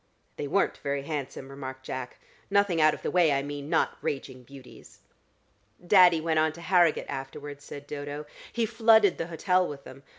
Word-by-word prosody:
"They 145 - -4
weren't 195 +7 +1
very 140 -1 -2
handsome," 140 -2 -5
remarked 130 -1 -8
Jack. 130 -2 -6 0.3
"Nothing 200 -5 +2
out 155 0 +5
of - - -15
the - - -2
way, 175 -4 +4
I 140 -1 +1
mean. 145 0 -6
Not - - +1
raging 130 -2 -4
beauties." 130 0 -15 0.8
"Daddy 180 -3 +6
went 160 0 +1
on 155 0 +2
to 170 - -12
Harrogate 175 -2 +3
afterwards," 140 +1 -7
said 145 0 -9
Dodo. 145 +1 -6 0.3
"He 235 -1 0
flooded 220 -3 +4
the 165 - -2
hotel 180 +2 +1
with 140 -1 -8
them. 135 - -12
150 Hz, 175 wpm, -27 LUFS, 140-175 Hz, 0.8 s, Daddy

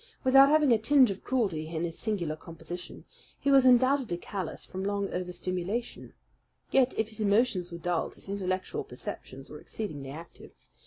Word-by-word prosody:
Without 270 +1 +7
having 300 -3 +4
a 225 - +3
tinge 255 0 +5
of 195 - -7
cruelty 195 -12 -1
in 160 0 -3
his 165 -1 -3
singular 180 -8 -2
composition, 165 +2 -9 0.3
he 280 - +1
was 270 -2 +6
undoubtedly 255 -5 +4
callous 185 -1 -6
from 190 +1 -6
long 200 0 -2
overstimulation. 180 +5 -4 0.6
Yet, 265 -1 +3
if 220 0 0
his 220 0 -4
emotions 205 -3 +2
were 170 - -6
dulled, 170 0 -2
his - - -12
intellectual 195 - -2
perceptions 410 - -8
were - - -8
exceedingly 145 -11 -6
active. 165 +5 -11
200 Hz, 160 wpm, -29 LUFS, 175-250 Hz, 0.6 s, Without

